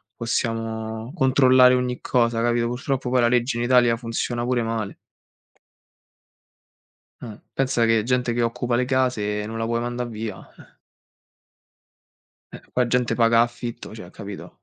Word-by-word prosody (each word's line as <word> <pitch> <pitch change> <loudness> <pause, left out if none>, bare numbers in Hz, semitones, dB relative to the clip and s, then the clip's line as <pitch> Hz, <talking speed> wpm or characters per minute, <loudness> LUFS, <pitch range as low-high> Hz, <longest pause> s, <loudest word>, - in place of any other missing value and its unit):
possiamo 115 0 -3
controllare 130 -4 +5
ogni 125 -1 -2
cosa, 115 -2 +1
capito. 120 0 +1
Purtroppo 125 +1 -3
poi 125 -1 +3
la 120 - +4
legge 120 +1 +1
in 120 - -1
Italia 120 -1 +4
funziona 120 +1 -3
pure 120 -1 0
male. 115 -3 -3 2.3
Eh, 110 -3 -8
pensa 130 -3 +1
che 115 -1 +3
gente 125 +1 0
che 120 - -1
occupa 120 +1 0
le 125 +1 +1
case 125 -6 0
non 115 +1 -6
la 115 - -1
puoi 115 0 -1
mandare 120 +1 -3
via, 110 -3 -6 0.2
eh. - - -18 1.8
Eh, - - -9
qua 125 - +2
gente 125 0 +1
paga 115 -1 +3
a - - +7
affitto, 120 0 -5
cioè - - -10
capito. - - -10
120 Hz, 150 wpm, -23 LUFS, 115-125 Hz, 2.3 s, a